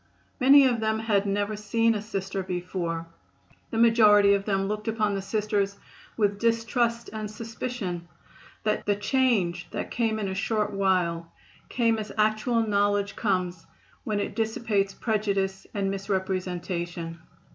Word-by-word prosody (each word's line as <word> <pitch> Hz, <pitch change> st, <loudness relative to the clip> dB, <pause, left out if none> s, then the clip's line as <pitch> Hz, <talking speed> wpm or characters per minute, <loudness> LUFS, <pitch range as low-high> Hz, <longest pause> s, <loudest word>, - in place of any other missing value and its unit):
Many 275 Hz, +2 st, +7 dB
of 245 Hz, -3 st, +2 dB
them 220 Hz, 0 st, 0 dB
had 210 Hz, -3 st, +1 dB
never 205 Hz, +1 st, 0 dB
seen 225 Hz, +2 st, +1 dB
a 210 Hz, -, -2 dB
Sister 195 Hz, -2 st, -3 dB
before; 175 Hz, -2 st, -3 dB, 0.6 s
the 225 Hz, -, -4 dB
majority 210 Hz, -3 st, +6 dB
of 200 Hz, 0 st, 0 dB
them 195 Hz, -2 st, 0 dB
looked 210 Hz, +1 st, -4 dB
upon 215 Hz, -2 st, +1 dB
the 195 Hz, -, -2 dB
Sisters 205 Hz, -1 st, -1 dB, 0.4 s
with 205 Hz, -2 st, +1 dB
distrust 230 Hz, +1 st, 0 dB
and 215 Hz, -1 st, -4 dB
suspicion. 215 Hz, -5 st, -5 dB, 0.6 s
The 210 Hz, -1 st, +1 dB
change 205 Hz, -9 st, +1 dB
that -, -, -5 dB
came 225 Hz, -2 st, 0 dB
in 210 Hz, -2 st, -2 dB
a 190 Hz, -, -3 dB
short 210 Hz, +1 st, 0 dB
while 180 Hz, -4 st, 0 dB, 0.4 s
came 230 Hz, -2 st, +1 dB
as 210 Hz, -1 st, -5 dB
actual 215 Hz, +2 st, +2 dB
knowledge 205 Hz, -1 st, +1 dB
comes 185 Hz, -5 st, -1 dB, 0.4 s
when 210 Hz, -2 st, -1 dB
it 200 Hz, -, -3 dB
dissipates 220 Hz, -3 st, 0 dB
prejudice 200 Hz, -3 st, -1 dB
and 195 Hz, -1 st, -1 dB
misrepresentation. 180 Hz, -3 st, -3 dB
205 Hz, 135 wpm, -26 LUFS, 190-220 Hz, 0.6 s, Many